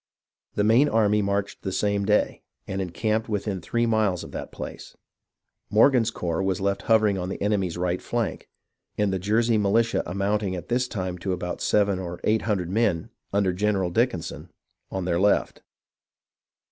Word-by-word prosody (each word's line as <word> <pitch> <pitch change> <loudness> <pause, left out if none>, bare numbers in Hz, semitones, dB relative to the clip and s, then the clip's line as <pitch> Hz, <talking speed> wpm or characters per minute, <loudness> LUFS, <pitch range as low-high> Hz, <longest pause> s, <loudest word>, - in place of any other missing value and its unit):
The 105 - +2
main 115 +7 +5
army 105 -1 +3
marched 100 0 -2
the 95 - -3
same 100 +1 0
day, 105 +1 +1 0.3
and 95 0 -2
encamped 110 +5 -1
within 100 -3 -2
three 120 +6 0
miles 110 -6 +1
of - - -10
that - - -6
place. - - -8 0.7
Morgan's 115 +1 +4
corps 85 -6 -2
was 95 -1 0
left 100 0 0
hovering 105 -3 +4
on 90 0 -3
the - - -5
enemy's 100 -5 0
right 90 0 -1
flank, 120 -3 -3 0.5
and 105 -2 +1
the 95 - -1
Jersey 110 +4 +2
militia 110 +3 +2
amounting 100 +1 -1
at 90 - -7
this 125 +1 +1
time 90 -6 -4
to 95 +1 -2
about 90 -1 -4
seven 100 -2 +2
or 85 -2 -6
eight 110 +1 +2
hundred 95 -5 -1
men, 100 -6 +1 0.2
under 100 -2 +2
General 95 -1 0
Dickinson, 115 -4 -1 0.4
on 95 -2 -3
their 85 -1 +1
left. 100 +2 +2
100 Hz, 165 wpm, -25 LUFS, 95-110 Hz, 0.7 s, main